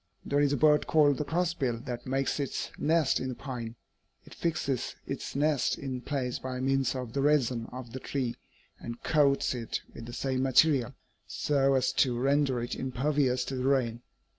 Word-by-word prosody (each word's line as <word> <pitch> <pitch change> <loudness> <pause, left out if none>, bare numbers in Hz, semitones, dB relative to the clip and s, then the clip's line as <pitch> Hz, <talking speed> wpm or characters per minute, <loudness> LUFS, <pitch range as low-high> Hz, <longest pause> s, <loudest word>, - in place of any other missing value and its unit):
"'There 145 - +1
is 145 -1 +3
a 145 - +1
bird 150 +1 +4
called 145 -3 +4
the - - +1
crossbill 160 -7 0
that 120 0 -6
makes 135 +2 0
its 140 - -3
nest 160 -2 +2
in 130 - -3
the 130 - -4
pine. 120 -4 -6 0.5
It - - -13
fixes 140 -6 -2
its - - -5
nest 145 -1 +1
in 130 -2 -4
place 125 -3 -2
by 130 -1 -4
means 135 0 +1
of 125 -3 -5
the 140 - 0
resin 130 -5 +2
of 125 -2 -8
the 130 - -4
tree 125 -3 -2 0.4
and 120 0 -8
coats 140 -4 +3
it 120 -3 -3
with 115 - -9
the 120 - -8
same 130 0 -1
material, 135 -1 +3 0.3
so 135 -2 +1
as 130 -1 +2
to 125 -3 +2
render 135 0 +2
it 120 - -4
impervious 130 0 0
to 135 - -4
the 130 0 -2
rain. 120 -4 +1
130 Hz, 185 wpm, -29 LUFS, 125-145 Hz, 0.5 s, bird